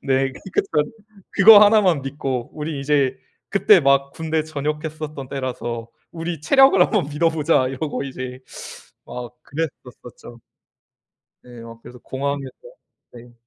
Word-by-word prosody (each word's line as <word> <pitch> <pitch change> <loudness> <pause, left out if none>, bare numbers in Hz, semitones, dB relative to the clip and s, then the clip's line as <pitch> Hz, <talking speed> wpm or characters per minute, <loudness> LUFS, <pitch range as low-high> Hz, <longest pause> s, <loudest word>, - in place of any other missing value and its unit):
네. 135 - 0 0.2
그러니까 185 +7 -2
전 150 +4 +1 0.4
그거 205 +1 +8
하나만 205 -8 +4
믿고 135 -3 -4
우리 150 -1 -5
이제 140 -2 +1 0.3
그 - - -2
때 - - +8
막 140 0 +2
군대 160 -1 -2
전역했었던 150 -1 -5
때라서 120 -3 -5 0.2
"우리 165 -2 -5
체력을 270 - +5
한 - - +4
번 195 - 0
믿어보자." 155 -3 +1
이러고 140 +2 -4
이제. 130 -1 -7 0.6
어. 120 -1 -8
그랬었었죠. 125 -5 -8 1.0
네. 120 -2 -13
막 115 0 -12
그래서 125 - -13
공항에서 140 +1 -4 0.6
네. 120 0 -14
140 Hz, 275 characters per minute, -21 LUFS, 130-160 Hz, 1.0 s, 그거